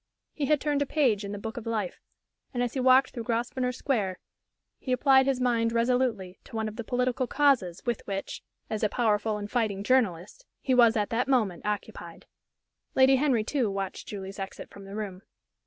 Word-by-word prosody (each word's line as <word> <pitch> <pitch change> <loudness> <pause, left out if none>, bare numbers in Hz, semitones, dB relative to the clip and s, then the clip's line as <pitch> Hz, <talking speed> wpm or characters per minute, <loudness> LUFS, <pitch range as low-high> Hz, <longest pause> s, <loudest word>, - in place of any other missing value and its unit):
He 285 -3 -2
had 300 0 +3
turned 290 -1 0
a 285 - 0
page 245 -10 +2
in 200 - -5
the 205 - -4
book 225 +3 -6
of 235 -1 -6
life; 215 -5 -3 0.5
and 245 - +1
as 240 - -2
he 270 - -2
walked 260 +1 +5
through 235 - -6
Grosvenor 250 +2 -1
Square 220 -8 -1 0.6
he 260 - -5
applied 265 +1 +4
his 270 -2 +1
mind 235 -2 +1
resolutely 230 -5 0
to - - -11
one 220 0 -1
of 215 - -6
the 235 - -5
political 250 +2 0
"causes" 250 - +2
with 240 -3 -1
which, 195 -1 -4 0.3
as 215 - -3
a 215 - +2
powerful 215 -2 +1
and 205 0 -6
fighting 215 -5 0
journalist, 215 - 0 0.2
he 260 - 0
was 235 -2 +5
at 205 -1 -1
that 240 +3 0
moment 215 -10 +1
occupied. 210 -1 -5 0.7
Lady 265 0 +6
Henry, 260 -5 +2
too, 250 -1 0
watched 195 -1 -4
Julie's 195 -1 -7
exit 195 0 -7
from 200 -1 -12
the 195 +1 -9
room. 200 -4 -5
230 Hz, 195 wpm, -28 LUFS, 205-255 Hz, 0.7 s, Lady